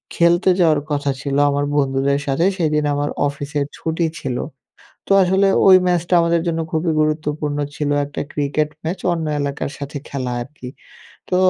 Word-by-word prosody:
খেলতে 175 +3 +3
যাওয়ার 155 -4 +4
কথা 145 -1 0
ছিল 140 -1 -2
আমার 145 0 0
বন্ধুদের 140 0 +1
সাথে 140 +6 +1
সেদিন 150 -3 +1
আমার 145 +1 -1 0.2
অফিসের 145 +1 -3
ছুটি 165 +1 -1
ছিল। 125 -2 -3 0.7
তো - - +3
আসলে 190 +2 +3 0.2
ওই 185 -1 +9
ম্যাচটা 175 0 0
আমাদের 170 0 +2
জন্য 165 -1 -1
খুবই 160 +1 0
গুরুত্বপূর্ণ 150 -1 -1 0.2
ছিল। 145 +1 -2 0.2
একটা 145 - -5
ক্রিকেট 150 +1 -1
ম্যাচ 175 +3 -3
অন্য 165 -2 -2
এলাকার 140 0 -3
সাথে 145 +1 -6
খেলা 130 -3 -3
আরকি। 130 0 -9 0.6
তো 180 - +2
150 Hz, 155 wpm, -20 LUFS, 140-170 Hz, 0.7 s, ওই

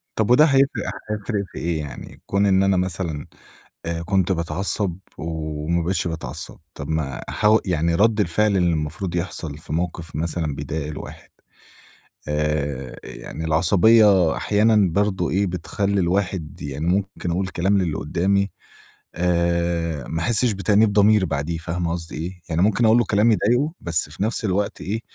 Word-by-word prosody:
طب 110 +2 +1
وده 150 +5 +7
هيفرق 135 -2 +2 0.3
هيفرق 105 -1 -2
في - - -11
إيه 85 -1 -1
يعني؟ 75 -4 -8
كون 100 +1 +1
إن 95 -1 +4
أنا 95 -1 +3
مثلًا 85 -4 -2 0.6
آآ 85 0 -2
كنت 95 +2 +1
باتعصب، 90 +2 -1 0.2
وما 80 +1 -2
بقيتش 90 +1 -1
باتعصب، 80 -1 -6 0.2
طب 70 - -7
ما 80 -5 -2
حو 105 +1 +4
يعني 85 -2 +1
رَدّ 110 +4 +3
الفعل 105 +3 +2
اللي 90 -1 +3
المفروض 80 +3 -3
يحصل 80 -4 -4
في 75 -1 -9
موقف 85 -1 -3
مثلًا 80 -1 -2
بيضايق 70 +2 -4
الواحد، 75 -1 -9 1.0
آآ، 75 -3 -2
يعني 80 - -7
العصبية 95 +3 +4
أحيانًا 105 -2 +3
برضه 95 -2 0
إيه، 100 +3 +1
بتخلّي 95 +3 -1
الواحد 90 -2 -1
يعني 75 +2 -4
ممكن 95 -1 -1
أقول 95 +3 -1
كلام 95 +3 +1
للّي 85 -5 0
قدامي، 100 +5 0 0.7
آآ 85 -3 0
ما 80 - -3
أحِسّش 120 +3 +2
بتأنيب 105 +1 +2
ضمير 105 -1 +5
بعديه، 75 +1 -2
فاهمة 85 +1 -3
قصدي 85 -1 -4
إيه؟ 90 +3 -6
يعني 80 +1 0
ممكن 110 +4 +3
أقول 110 +1 +6
له 120 - +3
كلام 110 +2 +3
يضايقُه، 120 +9 +2
بس 85 -3 -1
في 80 +6 -4
نفس 110 +1 -1
الوقت 100 +1 -1
إيه، 110 +4 -2
90 Hz, 155 wpm, -22 LUFS, 80-100 Hz, 1.0 s, وده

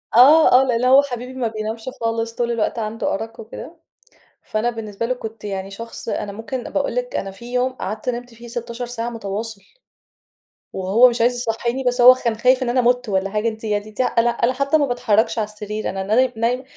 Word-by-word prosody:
آه، 295 +7 +8
آه، - - +3
لإن 245 -2 0
هو 265 +2 +7
حبيبي 250 -2 -6
ما 255 -3 -1
بينامش 220 +2 -5
خالص، 230 0 -1
طول 240 -1 -1
الوقت 230 0 -1
عنده 220 0 -2
أرق 225 +3 -5
وكده. 230 +9 -9 0.7
فأنا 215 +2 -1
بالنسبة 225 -2 -4
له 250 - 0
كنت 225 -3 -9
يعني 195 -1 -4
شخص، 230 +3 -7
أنا 205 - -3
ممكن 225 +5 -5
باقول - - -2
لِك - - -3
أنا 195 - -3
في 235 +5 -11
يوم 250 +1 +1
قعدت 215 0 -4
نمت 245 0 -5
فيه 235 +1 -12
16 235 +1 -5
ساعة 235 -1 -4
مُتواصل. 220 -1 -5 1.1
وهو 200 +7 +5
مش 235 -1 -2
عايز 245 +2 +3
يصحّيني، 240 +2 -2
بس 245 0 +1
هو 250 +1 +10
خا 255 - -10
كان 235 -2 +1
خايف 255 +4 +3
إن 245 - -2
أنا 250 +1 +2
مُت 245 -1 +1
والّا 195 0 0
حاجة، 210 +2 -1
أنتِ 220 0 -4
يعني 210 0 -2
ت 210 - -2
أنا 240 -1 +2
أنا 235 +1 +1
حتى 275 +4 +2
ما 290 - +2
باتحرّكش 225 -3 +1
على 215 - +1
السرير، 210 0 -5
أنا 195 0 -3
ناي 245 +6 +2
نايمة، 240 +3 0
230 Hz, 210 wpm, -21 LUFS, 215-250 Hz, 1.1 s, هو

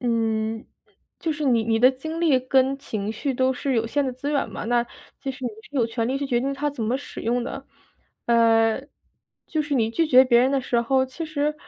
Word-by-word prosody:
嗯， 225 -2 -1 0.5
就 330 - -1
是 300 0 -4
你 240 -5 +3
你 225 0 +1
的 250 +3 +6
精 315 +5 -6
力 310 -6 +4
跟 265 +1 +2
情 215 -7 -4
绪 270 +5 -2
都 260 +1 +1
是 265 +1 -2
有 230 -1 +1
限 285 +5 0
的 260 - -2
资 280 +3 -4
源 285 - 0
嘛， - - -6
那 240 +1 +2 0.4
就 275 -1 -3
是 260 0 -8
你 245 - -1
是 290 - -10
有 240 -4 +3
权 230 0 -2
利 270 +2 -1
去 280 - -3
决 240 -3 +1
定 275 +2 -1
它 285 +2 -2
怎 280 -5 -6
么 230 +4 0
使 285 - -9
用 240 +2 0
的。 270 - -6 0.6
呃， 225 0 +3 0.6
就 310 -2 -1
是 295 - -6
你 225 -4 +2
拒 330 +8 +1
绝 260 -2 +7
别 240 -2 +4
人 255 +2 +3
的 275 -1 +1
时 245 -2 0
候， 260 +2 +1
其 260 +6 -6
实， 300 -1 -1
255 Hz, 250 characters per minute, -24 LUFS, 230-275 Hz, 0.6 s, 绝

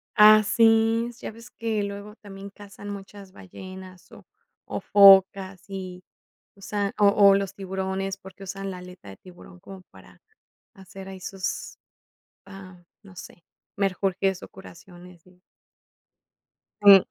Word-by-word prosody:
Ah, 215 0 +7
sí, 225 +2 +3
ya - - -7
ves 230 +1 -14
que 220 -2 -3
luego 200 +1 -7
también 200 -1 -11
cazan 205 0 -12
muchas 200 -1 -10
ballenas, 185 -1 -12
o - - -15 0.5
o, - - -3
focas, 195 -1 +5
y 185 -2 -8 0.5
usan 200 0 -4
o 205 - +5
o, 200 -1 +5
los 195 -1 -2
tiburones, 190 0 -4
porque 190 0 -14
usan 195 0 -6
la 185 - -8
aleta 180 - -13
de 95 - -12
tiburón 180 - -16
como 190 +1 -12
para - - -18 0.5
hacer 195 -1 -12
ahí 190 -1 -10
sus, 190 +1 -6 0.7
ajá, 185 -3 -13 0.2
no 195 -2 -16
sé, 175 -1 -12 0.3
menjurjes, 195 -1 -1
o, - - -9
curaciones, 180 -1 -15
sí. 180 0 -24 1.4
Sí. 200 -2 +8
195 Hz, 135 wpm, -24 LUFS, 185-200 Hz, 1.4 s, Sí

